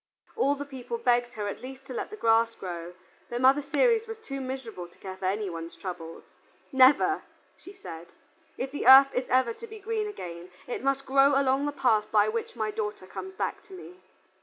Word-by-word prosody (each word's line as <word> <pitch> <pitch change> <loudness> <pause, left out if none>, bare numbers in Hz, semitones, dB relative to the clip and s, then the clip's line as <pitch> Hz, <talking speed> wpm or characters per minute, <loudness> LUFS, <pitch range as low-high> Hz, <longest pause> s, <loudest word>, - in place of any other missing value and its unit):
All 280 +1 +2
the 285 0 -6
people 275 - -6
begged 245 - +1
her 210 -1 -4
at 200 - -5
least 265 +1 -9
to 260 - -8
let - - -4
the 430 - -8
grass 230 - +3
grow, 175 -1 -7 0.3
but 240 - -3
Mother 265 +3 +5
Ceres 460 - +2
was 450 0 -6
too 275 -11 -6
miserable 255 -9 -6
to 175 - -23
care 190 -1 -8
for 190 - -7
any 205 +2 -1
one's 165 -1 -6
trouble. 170 -3 -7 0.5
"Never," 275 +9 +5 0.3
she 380 - -13
said. 170 - -10 0.5
"If 265 +1 -3
the 285 -4 -3
earth 270 +1 +9
is 250 0 -2
ever 255 -2 +3
to 460 - -10
be 440 -1 -10
green 430 +1 -2
again, 175 - -8 0.2
it 245 - -5
must 275 0 0
grow 275 +1 +4
along 275 +1 +1
the - - -1
path 220 -6 +1
by 210 0 +4
which 230 +2 -4
my 215 -2 -2
daughter 210 -3 -4
comes 380 - -8
back - - -3
to 395 - -15
me." 365 0 -11
260 Hz, 210 wpm, -28 LUFS, 210-285 Hz, 0.5 s, earth